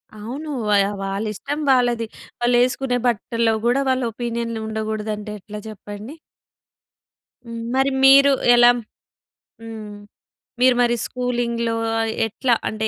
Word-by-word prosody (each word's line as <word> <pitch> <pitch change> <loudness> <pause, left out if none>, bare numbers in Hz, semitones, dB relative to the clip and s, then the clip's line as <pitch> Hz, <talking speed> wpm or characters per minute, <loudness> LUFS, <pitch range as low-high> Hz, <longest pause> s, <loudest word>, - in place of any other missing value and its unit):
అవును. 250 +9 -7 0.2
వ - - +2 0.3
వాళ్ళ 195 +2 -3
ఇష్టం 285 +8 -5
వాళ్ళది. 240 -3 +2 0.3
వాళ్ళు 240 0 +2
వేసుకునే 255 0 0
బట్టల్లో 230 0 0
గూడా 245 +3 +3
వాళ్ళ 260 0 +1
ఒపీనియన్ 235 0 -3
ఉండకూడదు 220 0 -3
అంటే 210 0 -7
ఎట్లా 210 +2 -8
చెప్పండి. 210 +5 -9 1.3
హ్మ్. 230 -1 -7
మరి 270 +1 +2
మీరు 275 +1 +8 0.2
ఎలా? 240 0 +7 0.9
హ్మ్. 220 -2 -8 0.7
మీరు 255 0 +5
మరి 240 0 +3
స్కూలింగ్‌లో 240 -2 -2 0.5
ఎట్లా 235 +3 0 0.2
అంటే 220 0 -2
235 Hz, 115 wpm, -21 LUFS, 220-250 Hz, 1.3 s, మీరు